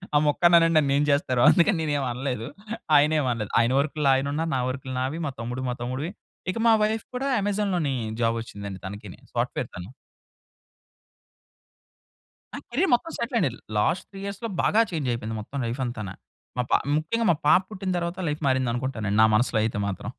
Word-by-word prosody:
ఆ -, -, +7 dB
మొక్కని 170 Hz, +4 st, +4 dB
అనండి 165 Hz, 0 st, +3 dB
నన్ను 140 Hz, -2 st, +1 dB
ఏం 145 Hz, -, +3 dB
చేస్తారో 140 Hz, -4 st, +2 dB
అందుకని 185 Hz, +1 st, +4 dB
నేను 150 Hz, -2 st, -1 dB
ఏమి 135 Hz, -2 st, -1 dB
అనలేదు. 125 Hz, -2 st, -3 dB, 0.5 s
ఆయనేమి 150 Hz, -1 st, +3 dB
అనలేదు 110 Hz, -4 st, -3 dB
ఆయన 115 Hz, +2 st, +2 dB
వర్క్‌లో 145 Hz, -1 st, +1 dB
ఆయన 135 Hz, +1 st, 0 dB
ఉన్నారు 160 Hz, +2 st, -1 dB
నా -, -, 0 dB
వర్క్‌లో 130 Hz, 0 st, -5 dB
నావి, 140 Hz, +6 st, -2 dB
మా -, -, -3 dB
తమ్ముడు 125 Hz, +3 st, -4 dB
మా 125 Hz, -, -2 dB
తమ్ముడివి 130 Hz, +7 st, -3 dB, 0.4 s
ఇక -, -, -6 dB
మా -, -, +7 dB
వైఫ్ 220 Hz, +1 st, 0 dB
కూడా 270 Hz, +2 st, -1 dB
'అమెజాన్‌లోనే' 195 Hz, -8 st, 0 dB, 0.3 s
జాబ్ 115 Hz, 0 st, +2 dB
వచ్చిందండి 100 Hz, -4 st, -8 dB
తనకిని 100 Hz, -1 st, -8 dB
సాఫ్ట్‌వేర్ -, -, -2 dB
తను. 90 Hz, +8 st, -8 dB, 2.6 s
నా -, -, -4 dB
కేరియర్ 275 Hz, +6 st, +1 dB
మొత్తం 330 Hz, +7 st, -5 dB
సెటిల్ 235 Hz, 0 st, -1 dB
అయింది. 130 Hz, -, -1 dB, 0.2 s
లాస్ట్ 110 Hz, -, +1 dB
3 195 Hz, -, -10 dB
ఇయర్స్‌లో 200 Hz, +3 st, -5 dB
బాగా 220 Hz, +2 st, +4 dB
చేంజ్ 150 Hz, -6 st, -2 dB
అయిపోయింది 115 Hz, -1 st, -3 dB
మొత్తం 140 Hz, +6 st, -8 dB
లైఫ్ 120 Hz, +3 st, -3 dB
అంతాన. 110 Hz, -5 st, -5 dB, 0.5 s
మా 125 Hz, -, +1 dB
పా -, -, +6 dB, 0.2 s
ముఖ్యంగా 225 Hz, +10 st, -1 dB
మా -, -, +2 dB
పాప 180 Hz, +4 st, +7 dB
పుట్టిన 190 Hz, -2 st, -4 dB
తరువాత 170 Hz, +1 st, -3 dB
లైఫ్ 150 Hz, +1 st, -2 dB
మారింది 130 Hz, -2 st, +2 dB
అనుకుంటానండి 110 Hz, -5 st, -1 dB
నా -, -, +7 dB
మనసులో 115 Hz, -1 st, +2 dB
అయితే 110 Hz, -2 st, -2 dB
మాత్రం. 100 Hz, +4 st, -5 dB
140 Hz, 180 wpm, -25 LUFS, 120-175 Hz, 2.6 s, ఆ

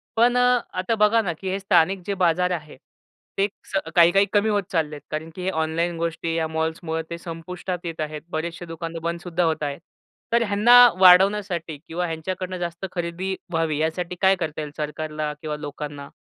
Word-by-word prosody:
पण 240 Hz, +2 st, +4 dB
अ, 250 Hz, 0 st, +4 dB, 0.2 s
आता 185 Hz, +5 st, 0 dB
बघा 215 Hz, +1 st, +4 dB
ना 180 Hz, -6 st, -2 dB
की 190 Hz, -, -4 dB
हे 190 Hz, +1 st, -1 dB
स्थानिक 190 Hz, -1 st, +3 dB
जे 200 Hz, -, -1 dB
बाजार 180 Hz, +1 st, +2 dB
आहे, 155 Hz, -5 st, -5 dB, 0.6 s
ते 195 Hz, -, +3 dB, 0.3 s
च -, -, +2 dB, 0.2 s
काही-काही 175 Hz, +3 st, +6 dB
कमी 210 Hz, +1 st, +3 dB
होत 205 Hz, -1 st, +1 dB
चालले 155 Hz, -4 st, 0 dB
आहेत 145 Hz, -, -10 dB
कारण 155 Hz, +1 st, -4 dB
की 185 Hz, -, -7 dB
हे 185 Hz, -, 0 dB
ऑनलाईन 165 Hz, 0 st, -1 dB
गोष्टी 165 Hz, 0 st, -2 dB
या 165 Hz, -1 st, 0 dB
मॉल्समुळं 160 Hz, +1 st, -2 dB
ते 170 Hz, -, -5 dB
संपुष्टात 175 Hz, +2 st, -6 dB
येत 165 Hz, -1 st, -5 dB
आहेत. 155 Hz, 0 st, -4 dB
बरेचसे 165 Hz, +1 st, -4 dB
दुकान 165 Hz, 0 st, -6 dB
तर -, -, -3 dB
बंदसुद्धा 170 Hz, +1 st, -2 dB
होत 160 Hz, -2 st, 0 dB
आहेत. 140 Hz, -1 st, -3 dB, 0.5 s
तर 235 Hz, 0 st, +4 dB
ह्यांना 205 Hz, +4 st, +4 dB, 0.3 s
वाढवण्यासाठी 185 Hz, -3 st, +5 dB
किंवा 175 Hz, +2 st, -2 dB
ह्यांच्याकडनं 185 Hz, +3 st, -4 dB
जास्त 175 Hz, +1 st, -4 dB
खरेदी 180 Hz, +2 st, -3 dB, 0.2 s
व्हावी 165 Hz, -2 st, 0 dB
यासाठी 165 Hz, +3 st, -2 dB
काय 190 Hz, 0 st, +5 dB
करता 155 Hz, -4 st, -4 dB
येईल, 150 Hz, -1 st, -6 dB
सरकारला 150 Hz, 0 st, -3 dB
किंवा 155 Hz, -1 st, -3 dB
लोकांना? 145 Hz, -1 st, -7 dB
170 Hz, 185 wpm, -23 LUFS, 160-190 Hz, 0.6 s, काही-काही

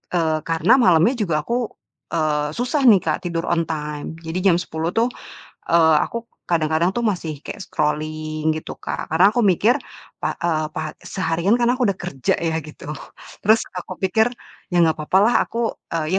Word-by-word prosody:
eee, 160 Hz, -2 st, +1 dB
karena 165 Hz, +10 st, +4 dB
malamnya 185 Hz, +5 st, +4 dB
juga 160 Hz, -8 st, 0 dB
aku, 240 Hz, -1 st, -1 dB, 0.5 s
eee, 150 Hz, -1 st, 0 dB
susah 250 Hz, +5 st, 0 dB
nih 200 Hz, -5 st, +7 dB
Kak, -, -, 0 dB
tidur 165 Hz, -1 st, -2 dB
on 165 Hz, -1 st, +1 dB
time. 150 Hz, -1 st, -4 dB
Jadi 160 Hz, +3 st, -3 dB
jam 185 Hz, -2 st, +4 dB
10.00 165 Hz, -1 st, -3 dB
tuh, 235 Hz, +2 st, +2 dB, 0.6 s
eee, 160 Hz, -2 st, +5 dB
aku 235 Hz, 0 st, -6 dB, 0.2 s
kadang-kadang 165 Hz, +2 st, +1 dB
tuh 240 Hz, -, -2 dB
masih 175 Hz, -10 st, -2 dB
kaya -, -, -7 dB
scrolling, 155 Hz, -2 st, -2 dB
gitu 155 Hz, 0 st, -6 dB
Kak, -, -, -5 dB
karena 180 Hz, +6 st, +4 dB
aku 240 Hz, -, +1 dB
mikir, 210 Hz, +3 st, +3 dB, 0.4 s
pak -, -, -2 dB
eee, 155 Hz, -2 st, +1 dB
pak 155 Hz, -1 st, -2 dB
seharian 185 Hz, +4 st, 0 dB
kan 240 Hz, 0 st, +2 dB
aku 250 Hz, -3 st, +1 dB
udah 195 Hz, -, 0 dB
kerja 175 Hz, -9 st, -1 dB
ya 160 Hz, -1 st, -1 dB
gitu, 155 Hz, 0 st, -12 dB, 0.6 s
terus 220 Hz, +2 st, +4 dB
aku 185 Hz, 0 st, -6 dB
pikir, 220 Hz, +5 st, +2 dB, 0.4 s
ya 175 Hz, -, -2 dB
gak 160 Hz, -, +3 dB
papa 165 Hz, +5 st, +2 dB
lah 235 Hz, -, +3 dB
aku, 230 Hz, -1 st, -1 dB, 0.2 s
eee, 160 Hz, 0 st, -2 dB
170 Hz, 175 wpm, -21 LUFS, 155-210 Hz, 0.6 s, nih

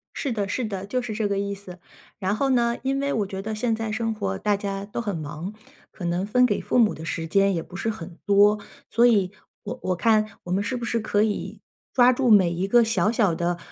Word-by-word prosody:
是 275 Hz, -, -2 dB
的 205 Hz, -4 st, -1 dB
是 240 Hz, +5 st, -2 dB
的， 195 Hz, -3 st, -4 dB
就 250 Hz, +6 st, -1 dB
是 240 Hz, -3 st, -5 dB
这 210 Hz, -1 st, 0 dB
个 200 Hz, -1 st, -1 dB
意 200 Hz, 0 st, -2 dB
思。 190 Hz, -2 st, -10 dB, 0.4 s
然 195 Hz, 0 st, 0 dB
后 275 Hz, +5 st, 0 dB
呢， 235 Hz, -2 st, +2 dB
因 270 Hz, +1 st, 0 dB
为 280 Hz, 0 st, -1 dB
我 210 Hz, -, 0 dB
觉 190 Hz, 0 st, -5 dB
得 220 Hz, +2 st, -4 dB
现 225 Hz, +1 st, 0 dB
在 225 Hz, -1 st, -3 dB
生 225 Hz, +1 st, -1 dB
活 95 Hz, -, -3 dB
大 205 Hz, -, +1 dB
家 195 Hz, 0 st, -4 dB
都 205 Hz, -, -5 dB
很 205 Hz, -5 st, -3 dB
忙， 160 Hz, +5 st, -6 dB, 0.4 s
可 180 Hz, -, -7 dB
能 175 Hz, +2 st, 0 dB
分 250 Hz, +5 st, +4 dB
给 -, -, +1 dB
父 -, -, 0 dB
母 220 Hz, -3 st, +4 dB
的 160 Hz, -, -8 dB
时 165 Hz, 0 st, -3 dB
间 195 Hz, +3 st, +3 dB
也 170 Hz, -, -1 dB
不 175 Hz, -, -12 dB
是 210 Hz, +4 st, -2 dB
很 175 Hz, -6 st, -7 dB
多。 205 Hz, +1 st, +5 dB, 0.3 s
所 235 Hz, +1 st, +4 dB
以 200 Hz, -6 st, +3 dB, 0.3 s
我 -, -, -6 dB
我 185 Hz, -, 0 dB
看 215 Hz, +2 st, +1 dB
我 175 Hz, -, -7 dB
们 195 Hz, +2 st, +1 dB
是 255 Hz, -, -2 dB
不 240 Hz, -, -4 dB
是 230 Hz, 0 st, 0 dB
可 210 Hz, -1 st, +1 dB
以 215 Hz, -2 st, -3 dB, 0.3 s
抓 250 Hz, -1 st, +6 dB
住 255 Hz, 0 st, +1 dB
每 195 Hz, -5 st, +6 dB
一 180 Hz, +3 st, -2 dB
个 240 Hz, +4 st, +5 dB
小 215 Hz, -3 st, +1 dB
小 205 Hz, -7 st, +2 dB
的， 175 Hz, +1 st, -1 dB
205 Hz, 265 characters per minute, -24 LUFS, 190-230 Hz, 0.4 s, 抓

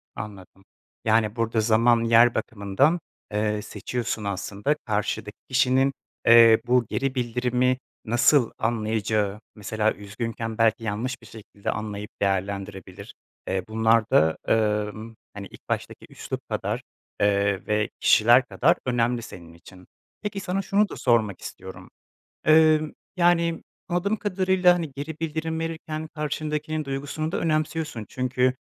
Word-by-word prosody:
Anladım, 95 Hz, -2 st, -9 dB, 0.4 s
yani, 110 Hz, 0 st, +2 dB
burada 115 Hz, -1 st, 0 dB
zaman 115 Hz, +1 st, +3 dB
yer 115 Hz, +1 st, +5 dB
bakımından, 110 Hz, -, +1 dB, 0.3 s
eee, 105 Hz, 0 st, 0 dB
seçiyorsun 110 Hz, +1 st, -4 dB
aslında. 100 Hz, +7 st, -2 dB
Karşıdaki 105 Hz, -1 st, -2 dB
kişinin, 130 Hz, +1 st, +3 dB, 0.3 s
eee, 115 Hz, -1 st, +8 dB
bu 125 Hz, -1 st, +3 dB
geri 135 Hz, 0 st, -1 dB
bildirimi 125 Hz, +1 st, +1 dB, 0.3 s
nasıl 120 Hz, +2 st, +3 dB
anlayacağı, 110 Hz, -2 st, -1 dB, 0.2 s
mesela, 110 Hz, +1 st, -1 dB
üzgünken 115 Hz, +2 st, -5 dB
belki 115 Hz, 0 st, +2 dB
yanlış 115 Hz, +4 st, -3 dB
bir -, -, -14 dB
şekilde 105 Hz, -2 st, -6 dB
anlayıp 105 Hz, -1 st, -5 dB
değerlendirebilir, 100 Hz, 0 st, -3 dB, 0.3 s
eee, 95 Hz, -1 st, -1 dB
bunlar 110 Hz, 0 st, +2 dB
da, 80 Hz, +1 st, +4 dB
emm, 110 Hz, 0 st, 0 dB, 0.2 s
hani, 100 Hz, -1 st, -7 dB
ilk -, -, -17 dB
baştaki -, -, -4 dB
üslup -, -, -7 dB
kadar, -, -, -2 dB, 0.4 s
eee, 100 Hz, -1 st, +1 dB
ve 105 Hz, 0 st, +1 dB
kişiler -, -, +5 dB
kadar -, -, +2 dB
önemli 120 Hz, -1 st, +1 dB
senin 85 Hz, -6 st, -11 dB
için. 90 Hz, +2 st, -16 dB, 0.3 s
Peki, 205 Hz, -2 st, -4 dB
sana 195 Hz, 0 st, -2 dB
şunu 200 Hz, +2 st, +1 dB
da -, -, -7 dB
sormak 110 Hz, -6 st, +1 dB
istiyorum, 95 Hz, 0 st, -9 dB, 0.6 s
emm, 155 Hz, -1 st, +5 dB, 0.2 s
yani, 170 Hz, -2 st, +2 dB, 0.3 s
anladığım 185 Hz, +5 st, 0 dB
kadarıyla, 185 Hz, -3 st, +3 dB
hani, 165 Hz, -5 st, -4 dB
geri 145 Hz, +2 st, -5 dB
bildirim 160 Hz, 0 st, -3 dB
verirken 160 Hz, -1 st, -5 dB
karşındakinin 150 Hz, 0 st, -3 dB
duygusunu 145 Hz, +4 st, -4 dB
da -, -, 0 dB
önemsiyorsun 155 Hz, -7 st, -1 dB
çünkü 130 Hz, 0 st, 0 dB
115 Hz, 125 wpm, -25 LUFS, 105-150 Hz, 0.6 s, eee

